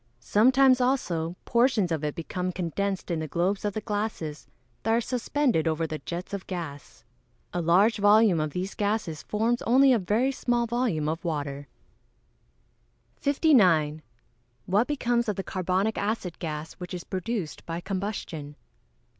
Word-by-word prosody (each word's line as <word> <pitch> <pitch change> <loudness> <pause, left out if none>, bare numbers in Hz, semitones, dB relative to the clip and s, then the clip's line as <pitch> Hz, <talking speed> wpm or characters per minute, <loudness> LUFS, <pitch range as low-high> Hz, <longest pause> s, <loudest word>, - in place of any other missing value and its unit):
Sometimes, 255 +4 +4
also, 175 -11 0
portions 235 -7 +2
of 155 -2 -1
it 150 -1 -2
become 180 +2 -3
condensed 185 +2 -2
in 165 - 0
the 160 - -3
globes 180 +6 0
of 205 -1 -1
the 215 - -3
glasses 205 -8 -4 0.3
that 225 - +1
are 230 - +4
suspended 245 - 0
over 160 0 0
the 155 -1 -4
jets 175 +3 -6
of 200 -2 -5
gas. 160 -7 -7 0.5
A 175 - -1
large 190 +8 +4
volume 205 -3 +5
of 155 0 0
these 180 +6 -4
gases 205 -7 -1
forms 230 +3 0
only 265 +3 +5
a 235 - +3
very 215 +8 +1
small 240 -2 0
volume 230 -10 0
of 160 +4 -2
water. 145 -4 -3 1.5
59. 185 - +3 0.7
_What 210 +6 +2
becomes 240 -5 0
of 210 - -1
the 195 - -3
carbonic 185 +4 -1
acid 200 -4 -2
gas 155 -1 -5
which 180 0 -7
is 175 - -6
produced 190 -3 -4
by 165 0 -3
combustion? 185 -6 -5
195 Hz, 150 wpm, -27 LUFS, 165-230 Hz, 1.5 s, volume